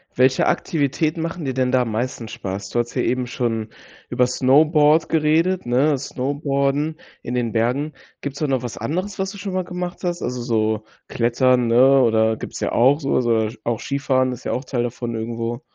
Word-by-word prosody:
Welche 130 +1 +3
Aktivitäten 155 +1 0
machen 165 -1 -4
dir 130 - -1
denn 130 0 0
da 130 -1 +3
am 115 - -4
meisten 120 +1 -3
Spaß? 100 -2 -5
Du 120 - -1
hattest 120 0 -2
hier - - +1
eben 125 0 0
schon 115 -3 -2 0.4
über 125 - +2
Snowboard 150 +5 +4
geredet, 165 +4 +2
ne 135 +5 +2
snowboarden 140 +3 -1 0.3
in 120 - -4
den 120 -3 -1
Bergen. 125 +7 0 0.3
Gibt's 140 -1 -6
da 150 - 0
noch 135 -3 0
was 120 -2 -6
anderes, 185 +7 -3
was 190 0 -1
du 200 - -10
schon 195 -1 -5
mal 185 0 0
gemacht 180 0 -5
hast? 175 -1 -2
Also, 125 0 -3
so 110 -2 0 0.2
Klettern, 120 +1 +2
ne, 130 +4 +5
oder 110 -1 +3
gibt's - - -7
ja - - -2
auch 135 +5 +4
so 140 -3 -3
oder - - +3
so 115 -1 0
auch 115 -1 -1
Skifahren 130 -2 0
ist 125 - -10
ja - - -2
auch 130 - -3
Teil 125 -2 -1
davon 120 -1 -4
irgendwo. 115 +2 -3
130 Hz, 200 wpm, -21 LUFS, 120-150 Hz, 0.4 s, ne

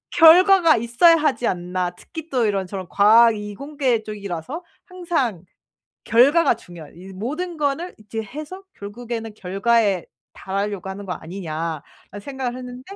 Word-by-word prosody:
'결과가 345 0 +7
있어야 235 +9 +5
하지 300 -6 0
않나.' 180 -1 -2
특히 320 - -10
또 250 -3 +1
이런저런 190 -2 -3
과학 225 +3 +6
이공계 250 +4 -2
쪽이라서 210 - -6 0.2
항상 325 - -2 0.6
결과가 270 +9 +4
중요한 175 -9 -13
'이 190 +2 -11
모든 305 - -4
거는 300 +4 -2
이제 215 +1 -6
해서 305 - -9
결국에는 225 +1 -7
결과에 200 0 +1 0.3
달하려고 195 -1 -4
하는 200 +1 -8
거 180 - -3
아니냐.'라는 165 +2 -7
생각을 260 +1 -5
했는데 250 0 -9
225 Hz, 315 characters per minute, -22 LUFS, 195-285 Hz, 0.6 s, 결과가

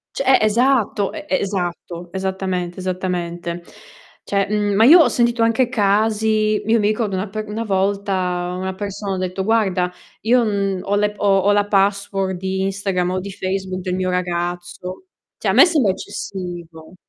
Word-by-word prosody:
Cioè 275 - -2
eh, 265 - +6
esatto, 220 -3 +2
e 305 -1 -8
esatto, 175 -6 -3
esattamente, 190 -2 -3
esattamente. 175 -2 -3 0.6
Cioè, 200 -1 0
mhmm, 205 -1 +1
ma 220 +3 +5
io 330 +7 +9
ho - - +3
sentito 235 -1 +1
anche 230 +2 +2
casi 215 -1 +1
io 230 +1 +3
mi 205 - +1
ricordo 215 -2 -1
una 190 +2 -3
per 215 +1 -5
una 220 +2 -3
volta 190 -3 -1
una 190 0 -3
persona 200 0 -4
ha - - -3
detto: 185 +1 -3
"Guarda, 190 -5 +1 0.3
io 240 +2 +4
n 200 -3 -1
ho 200 +1 -1
le 210 0 +1
p - - -21
ho 195 -1 +4
ho 205 - +5
la 205 0 +2
password 195 -1 0
di 190 +1 -2
Instagram 195 -2 -1
o 185 0 -1
di 200 +1 -7
Facebook 185 -1 -3
del 180 -1 -2
mio 185 0 -1
ragazzo." 175 - -3 0.3
Cioè, - - -2
a - - +4
me - - +8
sembra 290 - +2
eccessivo. 175 -4 -7
195 Hz, 170 wpm, -20 LUFS, 185-215 Hz, 0.6 s, io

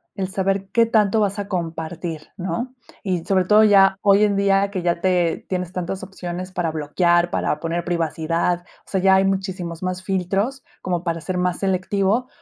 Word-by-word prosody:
el 190 -1 -2
saber 195 0 -1
qué 230 +1 +4
tanto 215 -1 +2
vas 205 0 0
a 200 - -4
compartir, 165 -2 -4
¿no?, 240 +8 -4 0.3
y 180 -4 -1
sobre 185 -2 +1
todo 215 +2 +6
ya 195 -2 +5
hoy 200 +1 +5
en 200 -1 +1
día 195 0 +2
que 185 -3 -3
ya 170 -1 +1
te 180 -3 +1
tienes 180 -1 -3
tantas 185 +1 -4
opciones 185 -1 -6
para 175 -3 -1
bloquear, 170 +3 +1
para 150 - -1
poner 170 +1 -2
privacidad, 170 +1 0 0.3
o - - -21
sea, 190 - 0
ya 190 0 +5
hay 190 0 +3
muchísimos 190 -3 -3
más 185 0 -3
filtros 195 +7 -1 0.2
como 175 -1 -2
para 165 -1 -2
ser 185 +1 -3
más 180 -1 0
selectivo, 195 +5 0
185 Hz, 185 wpm, -22 LUFS, 175-195 Hz, 0.3 s, todo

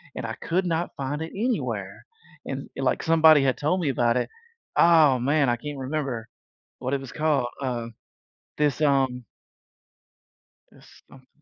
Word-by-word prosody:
and - - -5
I 110 - -5
could 180 - -1
not 170 0 -2
find 145 +3 -4
it 165 - -7
anywhere. 235 +4 -3 0.4
And - - -5
and, - - -3
like, - - +1
somebody 160 -3 +6
had 130 -2 +1
told 155 +6 0
me 150 - 0
about 120 -2 +2
it. - - -1 0.5
Oh, 155 -6 +6
man. 140 +1 +2
I 120 - +2
can't 145 +3 -7
remember 130 -5 -3 0.5
what 130 +2 -3
it 140 - +1
was 135 - -9
called. 150 -5 +1
Uh, 120 -3 -2 0.7
this, 150 -1 +1
um 135 -4 +1 1.5
This - - -19
something 130 -1 -18
140 Hz, 160 wpm, -25 LUFS, 125-155 Hz, 1.5 s, somebody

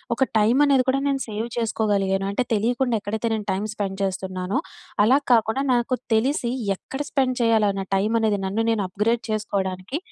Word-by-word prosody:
ఒక 265 - +2 0.2
టైం 220 +4 +3
అనేది 270 -3 +3
కూడా 275 +1 +1
నేను 275 -1 0
సేవ్ 215 +2 -3
చేసుకోగలిగాను. 200 -4 0
అంటే 225 +5 0
తెలీకుండా 240 +3 +1
ఎక్కడైతే 220 +3 -2
నేను 210 -2 -5
టైమ్ 200 +3 -2
స్పెండ్ 195 -2 -3
చేస్తున్నానో, 185 0 -2 0.5
అలా 265 +5 +5
కాకుండా 225 +3 +2
నాకు 240 +1 0 0.2
తెలిసి 245 +1 +1 0.3
ఎక్కడ 270 +8 -6
స్పెండ్ 260 -2 +1
చేయాలా 220 -3 +3
నా 195 - -3
టైం 205 +3 0
అనేది 210 -2 +1
నన్ను 205 +4 -1
నేను 225 -2 0
అప్గ్రేడ్ 225 +5 0
చేసుకోవడానికి 200 +1 -2
220 Hz, 165 wpm, -23 LUFS, 200-245 Hz, 0.5 s, అలా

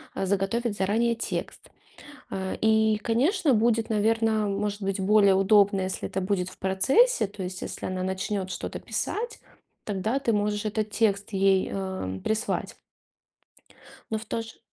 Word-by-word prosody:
э, - - -1
заготовить 200 +3 0
заранее 225 +5 +1
текст. 230 - -5 0.6
Э, 190 -1 -3
и, 220 -1 +3
конечно, 260 - +2
будет, 225 0 +2
наверно, 220 0 +2
может 205 +1 -2
быть, 195 0 -1
более 200 0 +5
удобно, 195 0 +4
если 185 0 -3
это 190 - -3
будет 185 -1 -1
в - - -16
процессе, 265 - +3
то 200 0 -8
есть 185 0 -5
если - - -5
она 185 0 -3
начнёт 190 +1 -2
что-то - - -5
писать, 470 +3 -3 0.4
тогда 215 +5 -1
ты 265 -4 0
можешь 210 0 0
этот 215 0 -2
текст 210 -1 0
ей, 195 -1 +2
э, 190 - -4
прислать. 220 0 -1 1.4
Но, 220 - +1
в 220 - -8
то 230 - -2
же 225 0 -11
205 Hz, 150 wpm, -26 LUFS, 190-225 Hz, 1.4 s, более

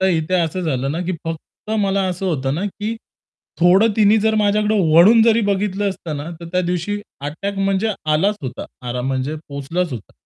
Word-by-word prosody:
तर 190 - +3
इथे 160 +4 -2
असं 175 0 0
झालं 135 -3 -1
ना, 165 - -3
की 185 - -1
फक्त 165 +5 -7
मला 195 0 +1
असं 185 +1 -3
होतं 135 -5 -1
ना, 180 - -2
की 210 +3 -4 0.7
थोडं 185 +6 +5
तिनी 215 0 +5
जर 220 +1 +2
माझ्याकडे 210 +1 +2 0.2
वळून 210 +8 +7
जरी 230 0 +4
बघितलं 200 0 0
असतं 170 -5 -6
ना, 145 +4 -6
तर - - -7
त्यादिवशी 180 +3 -1 0.3
अटॅक 195 +6 -4
म्हणजे 195 +2 +1 0.2
आलाच 195 +7 +2
होता 130 -2 -5 0.2
आराम 125 +1 -3
म्हणजे 135 +3 -1
पोहोचलाच 145 +4 -3
होता. 115 -5 -8
180 Hz, 180 wpm, -20 LUFS, 155-205 Hz, 0.7 s, वळून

